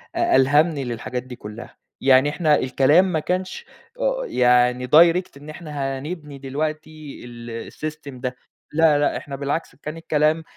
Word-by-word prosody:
أ -, -, +2 dB
ألهمني 145 Hz, +2 st, +3 dB
للحاجات 125 Hz, +1 st, -4 dB
دي 125 Hz, -1 st, -9 dB
كُلّها. 110 Hz, +1 st, -10 dB, 0.3 s
يعني 130 Hz, +1 st, +5 dB
إحنا 155 Hz, 0 st, +2 dB
الكلام 135 Hz, +7 st, +4 dB
ما 160 Hz, -, +1 dB
كانش 185 Hz, -, -3 dB, 0.3 s
أ -, -, 0 dB
يعني 125 Hz, -, +2 dB
direct 170 Hz, +5 st, +5 dB
إن 145 Hz, +2 st, -12 dB
إحنا 145 Hz, -4 st, -4 dB
هنبني 150 Hz, -2 st, -7 dB
دلوقتي 155 Hz, +2 st, -5 dB
ال 120 Hz, -1 st, -8 dB
الsystem 155 Hz, -2 st, -7 dB
ده. 125 Hz, 0 st, -3 dB, 0.4 s
لا 155 Hz, -2 st, +4 dB
لأ 145 Hz, -, +1 dB
إحنا 140 Hz, -1 st, -7 dB
بالعكس، 145 Hz, +4 st, -3 dB
كان 155 Hz, +2 st, -7 dB
الكلام 155 Hz, 0 st, +1 dB
145 Hz, 150 wpm, -22 LUFS, 130-160 Hz, 0.4 s, يعني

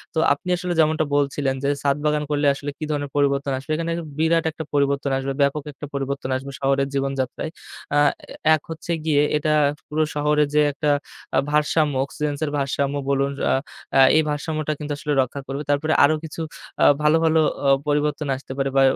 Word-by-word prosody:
তো -, -, +2 dB
আপনি 145 Hz, +5 st, -7 dB
আসলে 180 Hz, 0 st, -2 dB
যেমনটা 155 Hz, 0 st, +3 dB
বলছিলেন 140 Hz, -1 st, 0 dB
যে 140 Hz, -, +1 dB
ছাদ 140 Hz, 0 st, +1 dB
বাগান 150 Hz, 0 st, +1 dB
করলে 145 Hz, 0 st, +2 dB
আসলে 140 Hz, +1 st, -6 dB
কি -, -, -6 dB
ধরনের 145 Hz, -1 st, -2 dB
পরিবর্তন 140 Hz, -1 st, +1 dB
আসবে? 135 Hz, +4 st, -7 dB
এখানে 165 Hz, +1 st, -2 dB, 0.3 s
বিরাট 165 Hz, +1 st, +2 dB
একটা 160 Hz, -, -6 dB
পরিবর্তন 140 Hz, -1 st, +1 dB
আসবে, 135 Hz, +1 st, -2 dB
ব্যাপক 140 Hz, +1 st, +1 dB
একটা 145 Hz, -, -8 dB
পরিবর্তন 140 Hz, -1 st, -3 dB
আসবে 135 Hz, +1 st, -8 dB
শহরের 135 Hz, 0 st, +1 dB
জীবনযাত্রায়। 135 Hz, +2 st, -2 dB, 0.4 s
আ 145 Hz, -, +5 dB, 0.3 s
এ -, -, -7 dB, 0.2 s
এক 155 Hz, -, -6 dB
হচ্ছে 165 Hz, +1 st, -5 dB
গিয়ে 150 Hz, -2 st, +3 dB, 0.2 s
এটা 155 Hz, +1 st, +1 dB, 0.3 s
পুরো 155 Hz, +1 st, 0 dB
শহরে 150 Hz, 0 st, +2 dB
যে 150 Hz, -, +5 dB
একটা 145 Hz, +2 st, -1 dB, 0.5 s
আ -, -, +4 dB
ভারসাম্য 150 Hz, 0 st, +2 dB
অক্সিজেনসের 145 Hz, +1 st, -3 dB
ভারসাম্য 140 Hz, 0 st, -1 dB
বলুন 140 Hz, 0 st, +1 dB, 0.2 s
আ -, -, +4 dB, 0.6 s
এই 160 Hz, -, +6 dB
ভারসাম্যটা 155 Hz, +1 st, -2 dB
কিন্তু 150 Hz, 0 st, -5 dB
আসলে 150 Hz, +1 st, -2 dB
রক্ষা 130 Hz, +2 st, -4 dB
করবে। 140 Hz, +2 st, -4 dB
তারপরে 150 Hz, +2 st, +2 dB
আরো 150 Hz, +2 st, +5 dB
কিছু 160 Hz, +1 st, -6 dB, 0.4 s
আ -, -, +7 dB, 0.2 s
ভালো, 150 Hz, +1 st, +4 dB
ভালো 160 Hz, 0 st, +4 dB, 0.3 s
অ -, -, +5 dB, 0.2 s
পরিবর্তন 150 Hz, 0 st, 0 dB
আসতে 130 Hz, 0 st, -10 dB
পারে 135 Hz, 0 st, 0 dB
বা -, -, +6 dB
145 Hz, 185 wpm, -22 LUFS, 140-155 Hz, 0.6 s, আ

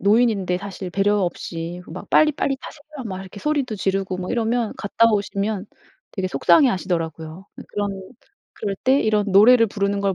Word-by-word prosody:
노인인데 205 Hz, -4 st, +2 dB
사실 195 Hz, -1 st, -7 dB
배려 200 Hz, +2 st, +2 dB
없이 175 Hz, -1 st, -4 dB
막 175 Hz, +4 st, -9 dB
"빨리빨리 295 Hz, -3 st, +3 dB
타세요." 295 Hz, -2 st, -10 dB
막 190 Hz, 0 st, -5 dB
이렇게 190 Hz, +1 st, -10 dB
소리도 285 Hz, -7 st, -1 dB
지르고 195 Hz, -1 st, -1 dB
막 180 Hz, 0 st, -5 dB
이러면 235 Hz, -1 st, 0 dB
갔다 230 Hz, +2 st, +2 dB
오시면 200 Hz, 0 st, -1 dB, 0.5 s
되게 185 Hz, -2 st, -2 dB
속상해하시더라고요. 170 Hz, -, +1 dB, 0.2 s
그런 200 Hz, -2 st, -3 dB, 0.5 s
그럴 200 Hz, -1 st, -3 dB
때 265 Hz, +2 st, +4 dB
이런 210 Hz, -1 st, +1 dB
노래를 230 Hz, +4 st, +7 dB
부르는 200 Hz, 0 st, -1 dB
걸 195 Hz, -1 st, 0 dB
200 Hz, 365 characters per minute, -22 LUFS, 185-230 Hz, 0.5 s, 노래를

